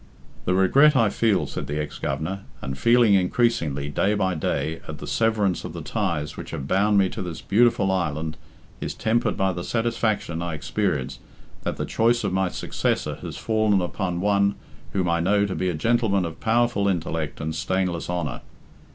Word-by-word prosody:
"The 90 - +2
regret 135 +11 +5
I 115 -4 +4
feel," 110 -2 +2
said - - -5
the 75 +1 -2
ex 75 -1 -5
Governor, 80 +8 -3 0.2
"and 65 - -5
feel 120 - +4
increasingly, 95 - +2
day 95 +8 +1
by 95 -2 +1
day, 80 0 -2
at 75 - -6
the - - -8
severance 110 -5 +1
of 90 - -6
the 85 -2 -6
ties 85 -7 -2
which - - -8
have 65 - -5
bound 100 +5 +3
me 95 -1 +5
to - - -6
this 90 -3 -5
beautiful 115 -2 +3
island 80 -4 -1 0.4
is - - -4
tempered 115 +1 0
by 95 -2 +1
the 85 0 -5
satisfaction 115 -7 -1
I 85 -2 -3
experience 75 - -2 0.4
that - - -3
the - - -2
choice 120 +1 +2
of - - -1
my 95 -1 +1
successor - - -2
has - - -6
fallen 110 -3 +2
upon 90 0 -2
one 100 0 +2 0.4
whom 95 -2 0
I 85 0 +2
know 100 +4 +3
to 100 - -3
be 95 - -1
a 85 - -2
gentleman 100 +1 +2
of 80 -1 -7
powerful 115 -2 +2
intellect 80 -5 -2
and 80 +1 -3
stainless 90 +2 -1
honour. 90 -3 -2
95 Hz, 185 wpm, -24 LUFS, 80-110 Hz, 0.4 s, regret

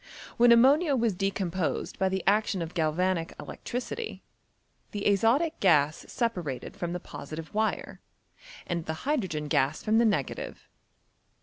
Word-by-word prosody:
When 240 0 +6
ammonia 275 +6 +5
was 230 -4 +1
decomposed 190 -2 -2
by 190 - +2
the 190 0 -2
action 200 -3 +2
of 165 +1 -7
galvanic 165 +1 0
electricity, 255 - -5 0.7
the 205 -1 -5
azotic 230 - +2
gas 155 -5 +3
separated 180 - -3
from 175 0 -3
the 180 - -3
posi 155 -2 -8
tive 160 -1 -8
wire, 220 +1 -1 0.6
and 170 -2 -3
the 160 +7 -5
hydrogen 190 - -1
gas 145 0 +1
from 220 +1 +3
the 235 - +4
negative. 195 - -2
190 Hz, 135 wpm, -28 LUFS, 165-230 Hz, 0.7 s, When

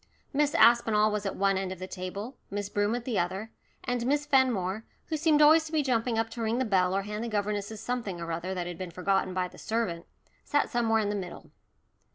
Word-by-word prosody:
Miss 290 +1 +2
Aspinall 220 -3 +5
was 210 -1 -2
at - - -3
one 195 0 +2
end 190 -1 -3
of 190 - -5
the 185 - -6
table, 195 +7 -6
Miss 205 0 -3
Broom 205 +2 +1
at 240 -1 -5
the 230 -7 0
other, 190 +5 -3 0.3
and 245 -2 -1
Miss 290 +2 +1
Fenmore, 230 -8 +2 0.3
who 315 - 0
seemed 305 -1 +4
always 315 +2 +6
to 315 - -8
be 310 -2 +2
jumping 240 -3 0
up 225 0 0
to 235 - -6
ring 225 +1 0
the 260 - +1
bell 185 -3 +2
or 195 - 0
hand 210 +2 -4
the - - -3
governesses 210 0 -2
something 230 -7 -3
or 170 0 -4
other 170 +3 -3
that 180 -1 -2
had 175 -1 -6
been 185 -1 -4
forgotten 185 +1 0
by 185 -1 0
the - - -15
servant, 200 -7 -2 0.4
sat 290 - 0
somewhere 225 -3 +2
in 205 - -1
the 205 - -1
middle. 185 -3 -7
210 Hz, 230 wpm, -28 LUFS, 190-240 Hz, 0.4 s, always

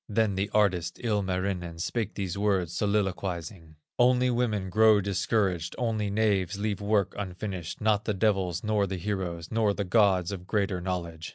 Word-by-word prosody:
Then 110 -1 +1
the 95 +2 -1
artist, 90 -5 +1
Ilmarinen. 95 -5 -1
Spake 110 +4 -2
these 95 -4 -3
words, 95 -4 0
soliloquizing: 95 -4 -2 0.2
"Only 125 +1 +4
women 110 -6 -1
grow 110 0 +6
discouraged, 95 -3 0
Only 110 -4 -1
knaves 100 -3 +1
leave 105 -1 -2
work 100 -2 +1
unfinished, 95 -2 -5
Not 105 -1 +2
the 105 - -1
devils, 95 -4 0
nor 105 -2 +1
the 95 0 -3
heroes, 90 -3 -4
Nor 110 -3 +2
the 100 - -1
Gods 95 -2 +3
of 90 -2 -7
greater 100 -4 0
knowledge." 85 -3 -4
100 Hz, 155 wpm, -28 LUFS, 90-105 Hz, 0.2 s, grow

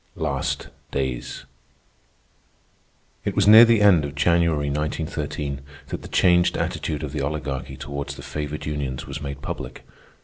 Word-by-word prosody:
LAST 70 -4 -2 0.2
DAYS 65 -2 -3 1.8
It - - -2
was - - +3
near 110 +2 +11
the 115 -2 +4
end 90 -7 +6
of 70 0 -5
January, 80 -1 +2
1913, 75 -1 -3 0.3
that - - -4
the - - -9
changed 90 0 +3
attitude 75 -1 -2
of 75 - -4
the 75 - -3
Oligarchy 70 -2 -3
toward 70 -1 -5
the 70 - -7
favored 75 0 -5
unions 70 -4 -3
was 80 - -6
made 70 -1 -6
public. 65 0 -6
75 Hz, 140 wpm, -24 LUFS, 70-80 Hz, 1.8 s, near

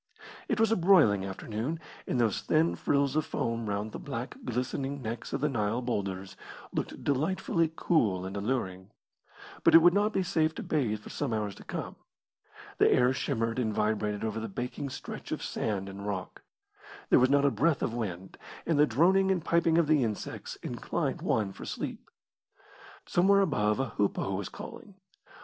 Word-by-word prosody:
It - - 0
was 225 -1 +4
a - - +4
broiling 165 - +5
afternoon, 110 - -4 0.3
and 125 - 0
those 115 -4 +1
thin 160 +2 +2
frills 140 -1 +1
of 155 - +2
foam 115 -4 -2
round 105 +2 -2
the - - -6
black, 125 -3 -5
glistening 135 +3 -2
necks 115 -2 -5
of 135 - -2
the 150 - +3
Nile 115 -4 0
boulders 95 -5 -3 0.4
looked - - -4
delightfully 165 +3 +1
cool 105 - +1
and 95 +1 -5
alluring. 100 -4 -2 0.7
But - - +6
it - - +14
would 175 0 +7
not 205 +2 +2
be 190 - 0
safe 160 -3 +1
to - - -5
bathe 115 -9 0
for - - -10
some 135 -6 -2
hours 105 -2 -2
to - - -13
come. - - -5 0.8
The - - +6
air 125 +1 +4
shimmered 115 -3 -1
and 110 -3 0
vibrated 105 -1 0
over 110 0 -2
the 110 0 -4
baking 125 +6 -4
stretch - - -7
of - - -3
sand 100 -3 -2
and 100 +1 -8
rock. 95 -3 -4 0.7
There - - +7
was 130 +1 +4
not 140 0 +4
a 140 - +4
breath 140 +7 +1
of 115 - -1
wind, 95 -6 -5 0.3
and 160 -3 +1
the 150 - +6
droning 185 +10 +4
and 180 -4 0
piping 170 -1 +3
of 170 - +4
the 150 -3 +3
insects 110 -3 -4
inclined - - -2
one 105 -3 0
for - - -10
sleep. - - -5 1.0
Somewhere 200 +3 +4
above 105 - +1
a 135 - 0
hoopoe 100 -1 -1
was 95 0 -3
calling. 200 - -10
125 Hz, 180 wpm, -29 LUFS, 105-155 Hz, 1.0 s, it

